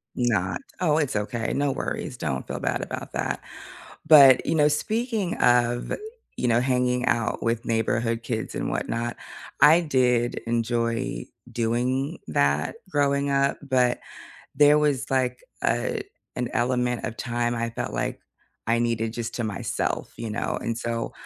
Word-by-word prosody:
Not 95 -7 0 0.2
Oh, 155 -4 +2
it's 145 -7 0
okay, 115 +2 -2
no 140 -1 +1
worries, 125 - -4
don't 65 - -3
feel - - -4
bad - - -1
about - - -6
that. - - -2 0.6
But, 140 -5 +8
you - - +1
know, 150 -1 +5
speaking 215 - -1
of, 120 0 +2 0.5
you 125 - 0
know, 120 0 +3
hanging 125 -1 +1
out 115 0 0
with 115 +1 -1
neighborhood 115 0 0
kids 110 -3 -3
and - - -2
whatnot, 120 +1 -2 0.4
I 160 +4 +8
did 125 -6 +1
enjoy 115 +1 -1 0.3
doing 125 +6 -1
that 70 - +1
growing 140 -3 +1
up, 140 0 +2
but 125 -3 +1 0.6
there 145 +1 +6
was, 145 -4 +1
like, 125 -1 0 0.2
a - - 0 0.3
an 125 -1 -1
element 125 0 0
of 115 - -4
time 120 0 -1
I 115 0 -2
felt 115 - -4
like - - -3 0.4
I 115 +1 +2
needed 115 -1 0
just 120 0 -4
to 120 - -2
myself, 105 -2 -2
you 115 -1 -4
know, 105 - -2
and 115 0 -2
so 115 -1 -3
120 Hz, 150 wpm, -25 LUFS, 115-135 Hz, 0.6 s, But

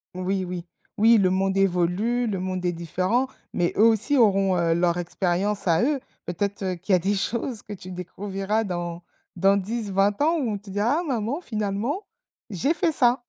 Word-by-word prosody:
Oui, 185 +1 -1
oui. 180 -1 -5 0.3
Oui, 225 +2 +6
le 190 -3 +3
monde 195 +1 +1
évolue, 195 +6 +1
le 200 -4 -2
monde 185 0 -3
est 175 - +2
différent, 185 +9 0 0.3
mais 175 -1 0
eux 215 - +4
aussi 225 +5 +3
auront, 195 -6 +4
heu, 170 -1 +2
leur 170 0 +1
expérience 185 +3 -1
à 165 +5 +3
eux. 285 +2 +1 0.3
Peut-être, 200 +3 -3
heu, 185 -1 -1
qu'il 185 +3 -2
y - - +8
a - - +3
des 195 +4 0
choses 230 +3 -2
que 210 - -8
tu 185 -1 -9
découvriras 195 +4 -3
dans 175 -3 -4 0.3
dans 195 +2 +4
10-20 200 0 0
ans 325 +3 +3
où 250 -6 -1
on 205 - -2
te 200 0 -14
dira: 215 - +1
«Ah - - -5
maman 255 +3 -2
finalement, 215 - -2 0.5
j'ai 225 - 0
fait 330 -1 0
ça». 245 -1 +3
195 Hz, 195 wpm, -25 LUFS, 180-225 Hz, 0.5 s, y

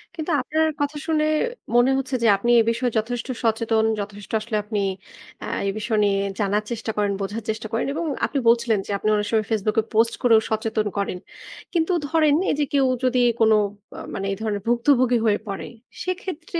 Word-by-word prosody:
কিন্তু 325 0 -3
আপনার 315 +5 +1
কথা 290 +1 -1
শুনে 310 -1 +2 0.5
মনে 245 +2 +5
হচ্ছে 265 0 -2
যে, - - +4
আপনি 235 +4 0
এ - - +6
বিষয়ে 240 +1 -1
যথেষ্ট 230 +2 -2 0.2
সচেতন, 225 0 +1
যথেষ্ট 205 -2 -7
আসলে 215 0 -2
আপনি 210 0 -3 0.6
আ - - -4 0.2
এ - - +2
বিষয় 215 0 -1
নিয়ে 200 -1 +2 0.2
জানার 205 0 +1
চেষ্টা 225 -1 -3
করেন, 205 -1 +1
বোঝার 205 +3 -4
চেষ্টা 220 0 -3
করেন 225 - 0
এবং 335 +2 -3 0.2
আপনি 280 - -2
বলছিলেন 235 -2 +3
যে - - -4
আপনি 215 - -1
অনেক 210 0 -1
সময় 220 -2 +2
Facebook-এ 215 +1 +1
post 230 +1 +3
করেও 230 -3 +6
সচেতন 220 -1 0
করেন। 200 -2 -1 0.6
কিন্তু 330 +1 +1 0.2
ধরেন, 310 -2 +3
এই - - +2
যে - - +3
কেউ 275 -1 +4 0.2
যদি 255 0 +2 0.2
কোনো 220 -1 +5 0.4
আ - - -6
মানে 195 - -3
এই 195 - -3
ধরনের 210 -2 -2
ভুক্তভোগী 245 +1 +3
হয়ে 210 -2 +3
পড়ে 195 -1 -5 0.4
সেক্ষেত্রে 365 -2 -4
225 Hz, 190 wpm, -23 LUFS, 215-265 Hz, 0.6 s, এ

